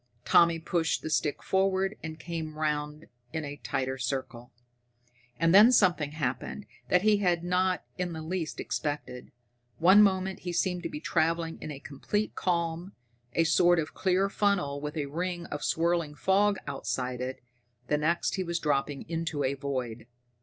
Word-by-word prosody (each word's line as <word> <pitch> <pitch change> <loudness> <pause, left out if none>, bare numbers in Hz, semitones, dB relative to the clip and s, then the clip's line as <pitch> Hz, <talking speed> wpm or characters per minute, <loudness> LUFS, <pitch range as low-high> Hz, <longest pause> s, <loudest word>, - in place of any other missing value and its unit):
Tommy 170 -1 +5
pushed 165 0 -1
the 155 - -4
stick 150 -1 0
forward 190 +1 +1
and 160 0 -6
came 160 -2 -5
round 150 0 -2 0.3
in 160 -1 -3
a 145 0 -6
tighter 130 -1 -3
circle. 125 -1 -4 0.9
And 165 +1 +3
then 210 +5 +9
something 175 - +3
happened 155 +7 -3 0.2
that 180 +1 +3
he 215 -1 +5
had 175 -4 +1
not 180 +1 +1 0.2
in 180 -1 -1
the 160 -1 -6
least 165 0 -3
expected. 145 -4 -4 0.5
One 190 +5 +7
moment 190 -2 +2
he 175 -1 -5
seemed 180 0 0
to - - -4
be 150 - -6
traveling 165 0 0
in - - -6
a 145 -2 -6
complete 205 +10 -3
calm, 170 +1 -1 0.4
a 165 - +3
sort 175 +2 +4
of 160 -1 -2
clear 190 +1 +1
funnel 195 -9 0
with 150 +2 -5
a 145 - -1
ring 175 +4 -3
of 145 - -4
swirling 170 -2 0
fog 200 +4 +2
outside 130 -2 -3
it 130 +1 -4 0.5
the 150 +4 +1
next 170 +5 0
he 190 - 0
was 170 -1 -2
dropping 145 -2 -1
into 160 -3 -2
a 135 +1 +1
void! 130 -5 -4
165 Hz, 165 wpm, -29 LUFS, 145-180 Hz, 0.9 s, then